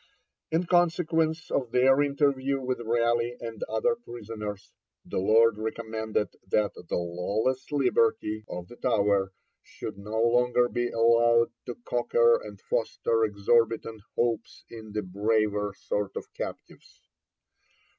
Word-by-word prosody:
In 165 +3 +1
consequence 165 -2 +1
of 125 -4 0
their 130 +3 +4
interview 140 -1 +1
with 130 -2 -3
Raleigh 120 +1 +1
and 115 -3 -7
other 110 - +1
prisoners, 110 - -8 0.3
the - - -3
Lords 110 +2 +4
recommended 110 -1 -2 0.2
that 105 +2 +1
'the 90 - -6
lawless 100 - -2
liberty' 115 -5 +1
of 90 0 -6
the 120 - -13
Tower 100 -5 +1 0.3
should - - -8
no 105 +2 -4
longer 120 +1 +3
be 120 0 -1
allowed 115 0 +4 0.2
to 120 - -4
cocker 120 -1 +3
and 105 -2 -10
foster 115 0 0
exorbitant 110 +1 +1
hopes 115 -2 -1
in 110 -2 -10
the 105 0 -2
braver 105 +1 0
sort 105 -1 -3
of - - -7
captives. - - -8
115 Hz, 125 wpm, -27 LUFS, 105-125 Hz, 0.3 s, their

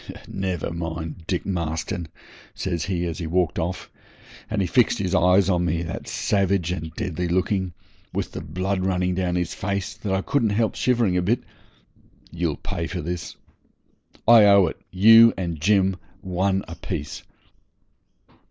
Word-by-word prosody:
'Never 95 -4 -3
mind, 80 0 -5
Dick 90 -3 -1
Marston,' 85 -1 -3 0.5
says 85 -5 -2
he, 90 -2 -1
as 85 -2 -4
he 85 - -4
walked 90 0 0
off; 90 +3 -4 0.6
and 110 - -1
he 95 - +2
fixed 120 +5 +3
his 95 -3 -2
eyes 90 +1 +4
on 90 -2 +2
me 85 -1 0
that 85 - -6
savage 95 -3 0
and 80 -3 -4
deadly 90 -4 -2
looking, 95 +1 0 0.4
with - - -3
the - - -6
blood 95 +4 -2
running 90 -1 0
down 90 -1 -1
his 90 -1 -1
face, 100 +1 -3
that 110 -3 -5
I 95 0 0
couldn't 125 -6 +1
help 115 -2 +1
shivering 115 -7 +1
a - - +2
bit, 115 +7 0 0.9
'you'll 85 -3 -2
pay - - -4
for - - -4
this. 85 +1 -5 0.9
I 115 -2 +8
owe 100 -2 +6
it 80 - -5
you 115 +4 +7
and 85 -5 -4
Jim, 95 0 +3 0.2
one 95 +1 0
a 85 - -7
piece.' 80 -3 -5
90 Hz, 160 wpm, -23 LUFS, 85-100 Hz, 0.9 s, I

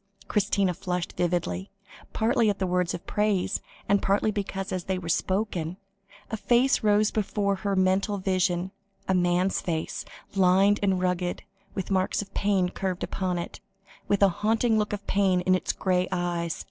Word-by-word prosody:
Christina 200 -2 +1
flushed 180 -1 -3
vividly, 165 - -1 0.4
partly 225 0 +2
at 200 - 0
the 190 - -1
words 180 -1 0
of - - -9
praise, 210 -3 0 0.4
partly 200 +2 +2
because, 195 -2 -4
as 185 -2 -3
they 190 -1 -1
were 180 - -7
spoken, 185 -1 -1 0.5
a 220 - -1
face 245 +4 +3
rose 210 0 +3
before 200 -2 0
her 200 0 -1
mental 190 +2 +2
vision, 185 -1 0 0.4
a 190 - +2
man's 180 +1 +2
face, 160 -2 -3 0.3
lined 195 +2 +4
and 190 -2 +2
rugged, 180 -1 -1 0.3
with 190 0 -4
marks 185 -1 +1
of 195 - -17
pain 195 -3 +1
carved 185 -1 -3
upon 185 -2 -2
it, 170 - -6 0.5
with 200 0 +2
a 200 - +7
haunting 225 +2 +2
look 210 - -1
of 205 -1 -4
pain 190 -2 +2
in 185 +1 +2
its 185 - +1
grey 185 -1 0
eyes. 175 -2 -2
190 Hz, 160 wpm, -27 LUFS, 180-205 Hz, 0.5 s, a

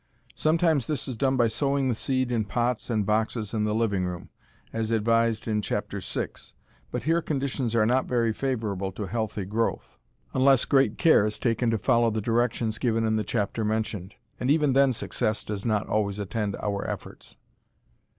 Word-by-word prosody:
Sometimes 160 -4 +2
this 150 -6 -2
is 130 - -4
done 130 +3 +1
by 120 - +4
sowing 135 +4 0
the 125 - +2
seed 130 +2 -1
in 115 -3 +1
pots 120 +4 -1
and 110 -4 +1
boxes 110 +1 -1
in 105 -1 0
the 105 0 0
living 105 -5 +1
room, 90 -1 -5 0.4
as 115 -1 -1
advised 115 0 +1
in 105 -1 +1
Chapter - - -3
VI, - - -3 0.6
but - - -4
here 165 +2 +2
conditions 135 -6 -2
are 110 -2 +4
not 125 +3 +2
very 115 -3 +1
favorable 105 -7 -2
to 105 - -4
healthy 110 -1 -3
growth, 110 +4 -2 0.3
unless 130 -1 +4
great 135 -6 +3
care 160 -10 +5
is 105 - -4
taken 115 0 +1
to 115 - +1
follow 120 0 +3
the 110 0 -1
directions 115 0 0
given 115 -2 +1
in 110 0 +1
the 110 - 0
chapter 110 +1 -1
mentioned, 105 -3 -2 0.2
and 125 - -1
even 150 -2 +3
then 135 0 +5
success 110 -2 -2
does 105 -2 -5
not 110 -2 +1
always 105 -2 0
attend 105 0 -2
our 100 -1 -2
efforts. - - -8
115 Hz, 180 wpm, -26 LUFS, 105-130 Hz, 0.6 s, care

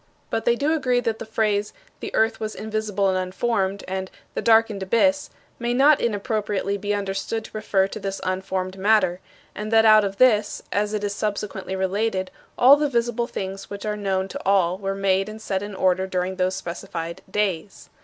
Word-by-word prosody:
But 225 - -1
they 235 - +4
do 290 +5 +1
agree 255 -6 +1
that 225 -2 -2
the - - -7
phrases, 210 -2 0 0.3
"The - - -5
earth 225 +1 +2
was 215 0 -4
invisible 215 -2 -1
and 185 - +1
unformed," 195 +1 -1
and 190 0 -3 0.2
"The - - -2
darkened 225 -3 +3
abyss," 280 +9 +2 0.3
may 240 0 -1
not 280 +3 +5
inappropriately 210 -3 -1
be 205 +1 -3
understood 200 +3 -3
to - - -12
refer 195 -3 +1
to - - -6
this 195 0 -4
unformed 185 0 -3
matter 190 -3 +3 0.3
and 215 +1 -5
that 225 0 +5
out 215 -1 +7
of 195 -1 -3
this, 215 -4 +3
as 210 +1 0
it 210 - -3
is 205 -1 -1
subsequently 200 -2 -3
related, 190 0 -1 0.3
all 265 +4 +8
the 295 0 0
visible 235 -1 0
things 195 -2 -6
which 200 +1 -7
are 210 0 -1
known 195 -2 -1
to - - -6
all 185 -2 +2
were 195 -1 -2
made 195 0 +1
and 215 +1 -8
set 195 -3 -2
in 205 -1 -6
order 185 0 +1
during 185 0 -2
those 185 0 +1
specified 170 -1 -6
"days." 195 -2 -2
205 Hz, 190 wpm, -23 LUFS, 190-220 Hz, 0.3 s, all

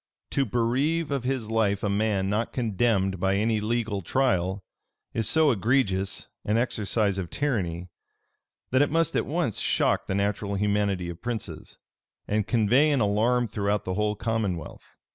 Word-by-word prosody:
To 135 - +1
bereave 135 +8 0
of 135 -3 -2
his 125 -4 -2
life 105 -3 +1
a - - +1
man 100 -1 0
not 105 +4 -1
condemned 105 -5 +1
by 95 +1 +1
any 110 +1 +1
legal 110 -2 -1
trial, 95 -4 0 0.5
is 115 -3 0
so 160 -2 +4
egregious 100 -4 0 0.2
an 105 +2 +1
exercise 105 -4 0
of 90 -3 -4
tyranny, 90 - -2 0.8
that 130 +2 +4
it 145 - +3
must 165 +1 +1
at - - 0
once 155 - -1
shock - - +1
the 95 - -1
natural 100 0 -1
humanity 100 -2 0
of 85 0 -11
princes, 120 -2 -6 0.5
and 105 -1 0
convey 125 +6 +3
an 145 -3 +2
alarm 115 +4 +2
throughout 105 -1 -1
the 95 - -2
whole 105 +2 0
commonwealth. 105 -6 -4
105 Hz, 155 wpm, -26 LUFS, 100-120 Hz, 0.8 s, so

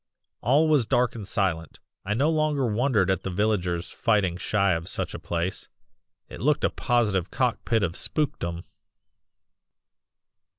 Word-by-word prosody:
"All 145 +7 +3
was 145 -7 +3
dark 125 -1 +2
and 105 -4 -7
silent. 85 -6 -2 0.2
I 105 +2 -1
no 145 +7 +2
longer 155 -3 +1
wondered 110 -4 +1
at 95 - -1
the - - -4
villagers 90 -3 -1
fighting 105 -6 +1
shy 100 +1 +1
of 85 0 -2
such - - -1
a - - -6
place; 85 +2 -3 0.6
it - - -10
looked 150 +2 +2
a - - +2
positive 105 -7 0
cock 125 -3 -1
pit 115 -3 +1
of 85 - -1
spookdom. 85 - -1
105 Hz, 145 wpm, -25 LUFS, 90-125 Hz, 0.6 s, All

